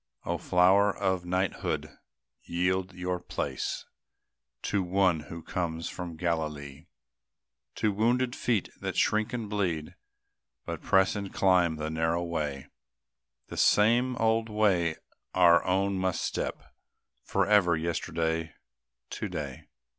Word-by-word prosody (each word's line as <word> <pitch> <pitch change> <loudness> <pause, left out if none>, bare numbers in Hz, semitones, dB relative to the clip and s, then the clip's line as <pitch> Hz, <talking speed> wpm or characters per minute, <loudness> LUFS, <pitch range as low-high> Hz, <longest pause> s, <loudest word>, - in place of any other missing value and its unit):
O - - -1
flower 95 +3 +4
of 95 -3 0
knighthood, 90 +1 -2 0.4
yield 90 +2 -1
your 90 0 -2
place 90 - -3 0.8
To 100 - 0
One 90 -2 +2
who 85 0 -7
comes 85 -2 -3
from 90 -2 -6
Galilee! 75 -3 -3 0.9
To 110 - +1
wounded 120 +4 +1
feet 115 -6 0
that - - -4
shrink 110 +1 +2
and 115 -3 -3
bleed, 90 -7 -2 0.7
But - - -5
press 95 +1 +3
and 100 -2 -4
climb 90 -4 +3
the 80 0 -4
narrow 80 +2 0
way, 75 -5 -3 0.8
The - - -7
same 120 +4 +4
old 115 0 +1
way 95 -7 +2 0.4
our 85 -2 +6
own 95 +1 +1
must 95 -2 0
step, - - -3 0.6
Forever, 100 -3 +3
yesterday, 80 -1 -2 0.6
to - - -4
day. - - -6
90 Hz, 115 wpm, -29 LUFS, 85-100 Hz, 0.9 s, our